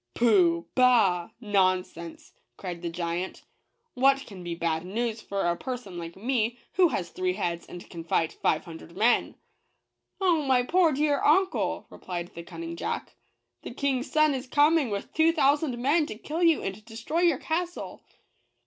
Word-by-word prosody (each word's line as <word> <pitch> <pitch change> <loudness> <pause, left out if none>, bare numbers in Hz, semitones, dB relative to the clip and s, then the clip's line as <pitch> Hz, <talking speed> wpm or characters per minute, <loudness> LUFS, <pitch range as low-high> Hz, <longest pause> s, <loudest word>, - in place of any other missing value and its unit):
Pooh! 180 -8 +3
— - - -51
bah! 220 -9 +4
— - - -49
nonsense," 185 -5 -1 0.2
cried 175 -3 -6
the 175 - -3
giant; 170 +2 -4 0.5
"what 270 +2 +3
can 190 -4 -10
be 170 -1 -4
bad 165 -1 -1
news 225 +4 -3
for 200 -2 -3
a 175 0 +1
person 235 -6 -6
like 165 0 -7
me, 235 +2 -1 0.2
who 365 -1 +5
has 175 - -3
three 185 0 -1
heads 170 -3 -3
and 175 - -10
can 165 -1 -8
fight 165 -1 0
five - - 0
hun 165 -1 -8
dred 170 +2 -14
men?" 230 +4 +2 0.8
"Oh, 350 -5 +3
my 260 -3 +3
poor 345 +4 +3
dear 290 0 +1
uncle!" 370 +5 +2
replied 175 -1 -6
the 170 - -7
cun 170 - -10
ning 335 0 -5
Jack - - -4 0.3
" - - -53
the - - -7
King's 270 -2 -1
son 310 -2 +4
is 260 -1 -4
coming, 295 0 +3
with 200 -1 -5
two 320 +1 +4
thousand 285 -3 +2
men, 295 +5 +2
to - - -6
kill 305 +9 -5
you 330 -3 +4
and 195 +2 -5
destroy 230 +8 -4
your 340 -6 +4
castle 345 +4 -4
230 Hz, 180 wpm, -27 LUFS, 180-290 Hz, 0.8 s, who